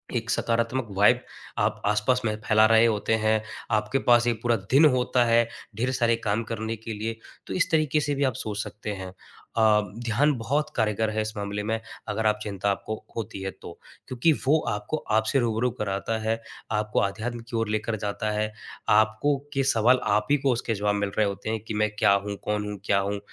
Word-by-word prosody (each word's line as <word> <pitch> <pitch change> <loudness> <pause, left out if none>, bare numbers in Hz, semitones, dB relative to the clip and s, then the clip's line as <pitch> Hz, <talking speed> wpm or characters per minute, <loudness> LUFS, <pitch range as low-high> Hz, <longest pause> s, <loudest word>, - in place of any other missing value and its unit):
एक 115 -1 -2
सकारात्मक 115 +2 0
वाइब 120 +5 +5 0.4
आप - - 0
आस-पास 105 +5 +2
में 110 -1 0
फैला 110 0 +5
रहे 115 +1 +6
होते 110 0 +1
हैं, 110 0 +3 0.3
आपके 105 +5 +1
पास 120 0 +6
एक 115 -2 0
पूरा 120 -1 +2 0.2
दिन 145 +4 +7
होता 125 0 +2
है, 115 0 +4 0.3
ढेर 125 +5 0
सारे 120 -3 +2
काम 105 +3 +1
करने 110 0 -4
के 110 +1 -6
लिए। 110 +2 -4 0.3
तो - - -4
इस 185 - +1
तरीके 155 -1 +2
से 145 -1 -1
भी 140 - 0
आप 130 -3 +2
सोच 105 -2 -4
सकते 105 0 -7
हैं। 95 -1 -6 0.5
अ, 110 -1 +5 0.2
ध्यान 145 +7 +3
बहुत 140 +7 -1
कारगर 110 -1 +1
है 110 0 -1
इस 110 +1 -4
मामले 100 0 -3
में, 110 +1 -1 0.3
अगर 110 +1 -2
आप 105 0 +1
चिंता 100 -1 -1
आपको 110 +2 -3 0.2
होती 110 -3 -5
है 95 0 -3
तो। 85 - -8 0.3
क्योंकि 130 +6 +2
वो 155 +3 +4
आपको 105 +9 -2 0.2
आपसे 110 +5 +2
रूबरू 120 0 +1
कराता 100 +2 -1
है, 115 +1 -1 0.3
आपको 105 0 0
आध्यात्म 110 +4 -2
की 120 - -5
ओर 115 -1 -1
लेकर 110 +1 -1
जाता 105 +1 -2
है, 105 0 -1 0.4
आपको 110 +7 +3 0.2
के 135 -1 +1
सवाल 120 +3 +4
आप 105 +1 +1
ही 145 - +5
को 135 0 +1
उसके 115 -1 -2
जवाब 105 0 0
मिल 100 -1 -1
रहे 110 - +4
होते 100 +2 -4
हैं 110 0 -1
कि 110 - -3
मैं 105 0 +1
क्या 100 - +5
हूँ? 100 -1 -3
कौन 105 0 -1
हूँ? 105 - -6
क्या 100 -1 +3
हूँ? 100 +1 -2
110 Hz, 210 wpm, -26 LUFS, 105-120 Hz, 0.5 s, दिन